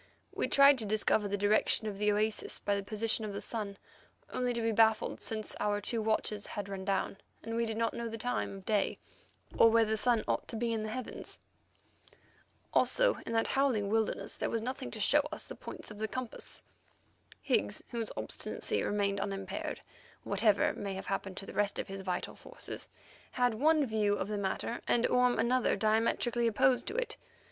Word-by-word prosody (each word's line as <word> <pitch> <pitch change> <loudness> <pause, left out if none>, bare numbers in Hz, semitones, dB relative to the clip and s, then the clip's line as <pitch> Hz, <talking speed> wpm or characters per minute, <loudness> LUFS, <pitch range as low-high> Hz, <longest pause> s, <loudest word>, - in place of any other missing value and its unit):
We - - 0
tried 275 -1 +6
to 220 - -2
discover 210 0 +2
the 205 0 -1
direction 205 +2 +2
of 205 -2 -4
the 210 0 +3
oasis 215 +1 0
by 205 - 0
the 200 - -1
position 215 +2 0
of 210 -2 -4
the 200 - -3
sun, 205 -4 -4 0.6
only 250 -1 0
to 235 -1 -1
be 225 - +2
baffled, 220 0 +3
since 215 -1 -2
our 205 0 +1
two 225 +3 -1
watches 215 -1 0
had 205 -1 -5
run 195 -1 -5
down, 195 0 -1 0.3
and 225 0 -4
we 230 0 +1
did 220 0 -3
not 230 0 +1
know 235 0 -3
the 225 - -5
time 245 -3 -2
of 190 - -13
day 210 -2 +1 0.6
or 230 - +9
where 225 0 +5
the 220 0 0
sun 235 0 +3
ought - - 0
to - - -6
be 230 +1 0
in 220 - -1
the 215 - -3
heavens. 250 +2 -5 1.4
Also, - - +4
in - - -3
that 225 0 +2
howling 255 -7 +1
wilderness 220 0 0
there - - -1
was 225 -1 -1
nothing 255 +2 -4
to 220 - -7
show 280 +8 +5
us 310 - -4
the - - -8
points - - -8
of 210 - -10
the 220 - -1
compass. 250 +1 -6 0.8
Higgs, - - 0
whose 230 -2 -3
obstinacy - - -3
remained 200 -1 0
unimpaired, 195 -1 -4 0.4
whatever 205 0 +3
may 195 -1 -4
have 190 - -6
happened 195 -1 -3
to 195 - -5
the - - -9
rest 205 -1 +1
of - - -3
his 195 0 -5
vital 180 -2 -3
forces, - - -6 0.4
had 245 -2 +2
one 300 +5 +3
view 215 -3 +1
of 195 0 -3
the 210 - -1
matter, 200 +4 -2
and 235 - +3
Orme 250 0 +3
another 245 +3 +2
diametrically 225 +3 +2
opposed 250 +2 +3
to - - -3
it. - - -2
220 Hz, 195 wpm, -32 LUFS, 205-235 Hz, 1.4 s, or